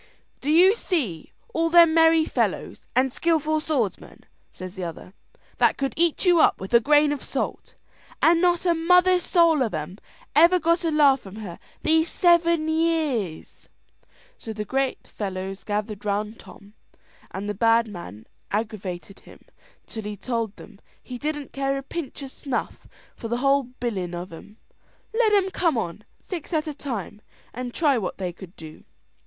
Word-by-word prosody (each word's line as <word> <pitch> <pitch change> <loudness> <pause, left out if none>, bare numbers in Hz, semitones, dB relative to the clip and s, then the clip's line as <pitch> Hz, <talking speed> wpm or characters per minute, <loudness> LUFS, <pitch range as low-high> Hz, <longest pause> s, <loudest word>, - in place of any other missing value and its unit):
"Do 285 - -4
you 355 +6 +6
see 280 - -3 0.2
all 330 0 +1
them 335 -1 +7
merry 325 -1 +5
fellows - - -2
and 255 0 +2
skilful 310 -1 +1
swordsmen," 275 -10 -3 0.3
says 185 0 -9
the 190 -2 -6
other, 170 +2 -8 0.5
"that - - +3
could 275 -1 -2
eat 340 +2 +1
you 350 -2 +5
up - - +4
with 190 +4 -8
a 235 - +8
grain 295 +4 +4
of 290 - -4
salt, - - -4 0.4
and 335 +1 +4
not 350 -1 +2
a 345 - +4
mother's 360 +2 +4
soul 335 -4 +3
of 225 -8 0
'em 155 +6 -6 0.4
ever 340 +4 +6
got 335 +1 +1
a 330 - +1
laugh 290 -3 +4
from 195 -3 -12
her 200 -6 -8 0.2
these 320 +1 +3
seven 335 -2 +3
years?" 315 - -1 0.7
So 220 - -6
the 260 +6 -1
fellows 190 -1 -6
gathered 210 0 -3
round 210 +2 -2
Tom, 200 +2 -15 0.6
and 195 +2 -6
the 210 - -2
bad 230 +2 +3
man 170 - -9 0.2
aggravated 195 -4 -4
him - - -17 0.4
till 225 - -7
he 210 -1 -6
told 230 -2 -3
them 200 - -14 0.2
he 250 -1 -8
didn't 295 -1 -4
care 275 0 -1
a 275 - -5
pinch 285 -1 -6
o' - - -5
snuff 265 -1 -5 0.3
for 230 - -7
the 235 +1 -1
whole 275 +1 +2
bilin' 190 -8 -3
of 175 0 -7
'em; 205 +6 -13 0.6
let 450 -1 +3
'em 390 -2 +3
come 335 -8 +1
on, 205 -1 -4 0.2
six 350 -4 -7
at 310 -1 +1
a 305 - -4
time, 230 -7 -6 0.3
and 250 +1 -5
try 290 -7 +2
what 190 - -4
they 180 -2 -4
could 185 0 -13
do. 155 -1 -12
265 Hz, 170 wpm, -24 LUFS, 205-325 Hz, 0.7 s, a